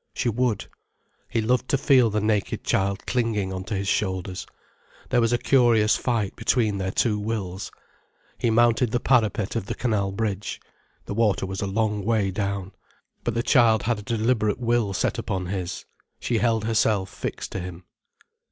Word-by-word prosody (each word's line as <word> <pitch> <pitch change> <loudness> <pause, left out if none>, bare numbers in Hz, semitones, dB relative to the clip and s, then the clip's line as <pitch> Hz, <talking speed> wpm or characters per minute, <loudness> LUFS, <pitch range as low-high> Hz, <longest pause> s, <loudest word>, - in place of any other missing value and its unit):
She 120 - 0
would. 120 -1 0 0.6
He 115 - 0
loved 125 +3 +1
to 140 - +3
feel 130 -4 +4
the 105 0 0
naked 105 -2 0
child 95 0 0
clinging 110 -6 0
on 95 0 -4
to 105 - -3
his 100 0 -2
shoulders. 95 -2 -1 0.6
There 120 - +3
was 115 0 +2
a 120 - +3
curious 120 -5 +4
fight 115 -6 -1
between 110 -3 +1
their 95 0 -1
two 105 +2 +1
wills. 100 -3 -4 0.7
He 120 - +1
mounted 120 +1 +3
the 120 - 0
parapet 110 -5 +1
of 115 -3 -2
the - - -3
canal 105 -5 0
bridge. 105 -1 -3 0.5
The - - -4
water 105 -3 +1
was 95 0 -4
a 100 - -1
long 105 0 0
way 105 -2 +1
down. 100 -1 -3 0.5
But 120 - -2
the 115 - 0
child 115 -6 +4
had 115 0 0
a - - -7
deliberate 110 -1 0
will 120 -4 +1
set - - 0
upon 95 -1 -2
his. 90 -1 -4 0.3
She 115 -2 0
held 115 -2 +1
herself 110 -4 +1
fixed - - -5
to - - -3
him. 90 0 -7
110 Hz, 175 wpm, -25 LUFS, 100-115 Hz, 0.7 s, feel